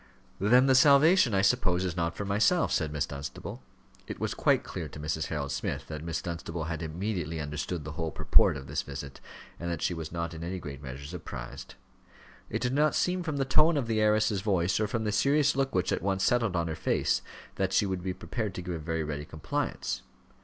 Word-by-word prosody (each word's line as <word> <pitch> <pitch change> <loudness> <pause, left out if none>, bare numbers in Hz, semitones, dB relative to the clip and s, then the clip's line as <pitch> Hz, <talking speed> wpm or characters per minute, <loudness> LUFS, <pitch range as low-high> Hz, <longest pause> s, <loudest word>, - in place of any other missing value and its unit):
"Then 125 +6 +5
the 135 - +5
salvation, 140 - +6
I 95 - +3
suppose, 95 -5 +2
is 90 -2 -2
not 85 -1 -1
for 100 - -3
myself," 110 - +2
said 80 -3 0
Miss 75 -1 0
Dunstable. 70 -1 -7 0.5
It - - -6
was - - -1
quite - - +2
clear - - -5
to - - -10
Mrs. 75 +1 -2
Harold 70 -3 -3
Smith 65 - -3
that 75 -1 -5
Miss 85 -1 -3
Dunstable 85 -1 -4
had 80 0 -4
immediately 85 0 -3
understood 75 +3 -3
the 75 - -6
whole 80 +1 -3
purport 75 - +4
of 65 - -8
this 70 +3 -2
visit, 70 -1 -7 0.4
and 85 - -3
that 85 - -3
she - - +1
was 80 -2 -6
not 85 0 -3
in 80 0 -7
any 90 +2 -3
great 70 -5 -7
measure 70 0 -7
surprised. 70 -6 -8 0.7
It - - -2
did 125 0 0
not 150 +2 +3
seem 180 0 +1
from 155 -4 -3
the 135 - +1
tone 155 +4 +4
of 135 - 0
the 110 -1 0
heiress's 105 -2 +3
voice, 95 -3 +1
or 110 - +1
from 110 +2 -2
the 105 - 0
serious 145 +7 +3
look 135 -4 0
which 90 0 +1
at - - 0
once 95 0 0
settled 115 -6 +2
on 85 -1 0
her 80 - -3
face, - - +1 0.4
that 95 -1 0
she 105 - +3
would 95 -2 -2
be 95 +1 -2
prepared 110 -6 -4
to 90 - -5
give 90 0 -4
a 85 - -4
very 80 +1 -2
ready 75 -1 -4
compliance. 80 -1 -3
90 Hz, 225 wpm, -29 LUFS, 80-110 Hz, 0.7 s, salvation